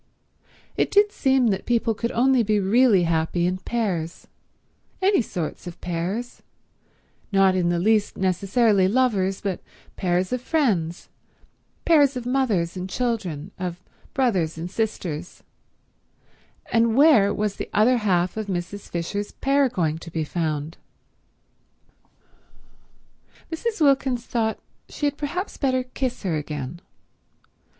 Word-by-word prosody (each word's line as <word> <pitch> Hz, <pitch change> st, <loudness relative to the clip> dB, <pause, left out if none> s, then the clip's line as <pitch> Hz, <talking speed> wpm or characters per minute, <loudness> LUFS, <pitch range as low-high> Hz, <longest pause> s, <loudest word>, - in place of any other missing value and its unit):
It -, -, +2 dB
did 410 Hz, 0 st, +4 dB
seem 265 Hz, -, +2 dB
that 195 Hz, -2 st, -2 dB
people 230 Hz, -1 st, +2 dB
could 235 Hz, +3 st, -3 dB
only 260 Hz, +1 st, +3 dB
be 215 Hz, -1 st, +1 dB
really 205 Hz, 0 st, +4 dB
happy 165 Hz, +1 st, 0 dB
in 185 Hz, +1 st, -1 dB
pairs—any 220 Hz, -, -3 dB
sorts 180 Hz, -5 st, -5 dB
of 175 Hz, -, -8 dB
pairs, 180 Hz, +8 st, -4 dB, 0.9 s
not 195 Hz, -1 st, +4 dB
in 180 Hz, -2 st, +1 dB
the 175 Hz, -, +1 dB
least 210 Hz, +3 st, +1 dB
necessarily 195 Hz, +2 st, +2 dB
lovers, 200 Hz, -5 st, +1 dB
but 195 Hz, -3 st, -2 dB, 0.4 s
pairs 180 Hz, +2 st, 0 dB
of 250 Hz, -, -1 dB
friends, 205 Hz, -, 0 dB, 0.8 s
pairs 290 Hz, -5 st, +4 dB
of 245 Hz, -, -6 dB
mothers 230 Hz, -10 st, 0 dB
and 185 Hz, +1 st, -5 dB
children, 195 Hz, -, -2 dB
of 175 Hz, -1 st, -4 dB, 0.4 s
brothers 190 Hz, -12 st, +1 dB
and 170 Hz, +2 st, -5 dB
sisters—and 180 Hz, -7 st, -3 dB, 1.6 s
where 260 Hz, -9 st, +6 dB
was 210 Hz, -1 st, -2 dB
the -, -, -5 dB
other 240 Hz, +4 st, +4 dB
half 185 Hz, -4 st, +1 dB
of 215 Hz, -1 st, -3 dB
Mrs. 185 Hz, +2 st, -5 dB
Fisher's 200 Hz, +5 st, -3 dB
pair 275 Hz, 0 st, +2 dB
going 160 Hz, -7 st, -1 dB
to 170 Hz, -, -10 dB
be 160 Hz, -1 st, -2 dB
found? 155 Hz, -1 st, -3 dB, 2.7 s
Mrs. 430 Hz, +7 st, -3 dB
Wilkins 270 Hz, -5 st, +2 dB
thought 220 Hz, -2 st, -1 dB, 0.3 s
she 295 Hz, -, -4 dB
had 285 Hz, 0 st, +1 dB
perhaps 345 Hz, +7 st, -4 dB
better 260 Hz, -2 st, +1 dB
kiss 255 Hz, -1 st, -4 dB
her 170 Hz, -5 st, 0 dB
again. 150 Hz, +1 st, -5 dB
205 Hz, 125 wpm, -24 LUFS, 175-250 Hz, 2.7 s, where